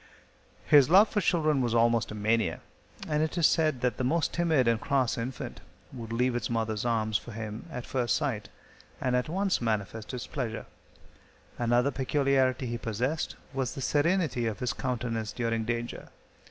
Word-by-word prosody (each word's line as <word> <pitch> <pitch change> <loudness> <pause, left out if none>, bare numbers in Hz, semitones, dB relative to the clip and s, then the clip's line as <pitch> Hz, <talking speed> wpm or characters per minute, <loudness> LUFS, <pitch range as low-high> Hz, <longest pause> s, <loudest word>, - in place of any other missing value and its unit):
His 145 -2 +6
love 195 +5 +7
for 210 - 0
children 155 -6 +2
was 120 -2 0
almost 115 0 +3
a 105 - -6
mania, 110 +1 0 0.5
and 150 0 +1
it 155 +2 -1
is 170 - +4
said 155 -7 +2
that 125 -3 0
the - - -2
most 155 +5 +1
timid 160 -7 +2
and 115 -1 +2
cross 130 -4 +1
infant 125 +2 -5 0.3
would 115 -3 -7
leave 125 +1 +1
its 120 - -2
mother's 110 -2 -1
arms 110 -3 +1
for 120 - -10
him 110 +5 -6
at 125 -4 -5
first 125 -3 0
sight, 135 -9 -2 0.5
and 125 -1 0
at 125 +3 0
once 190 0 0
manifest 110 -1 -2
its 125 -2 -5
pleasure. 120 -6 -4 0.9
Another 120 +3 +2
peculiarity 135 -1 +1
he 120 -1 -3
possessed 125 +8 -2 0.2
was 135 0 -2
the - - -6
serenity 150 -4 +1
of 110 -3 -3
his 125 - -1
countenance 115 -4 -3
during 115 -2 -1
danger. 120 +1 -4
125 Hz, 170 wpm, -29 LUFS, 115-140 Hz, 0.9 s, love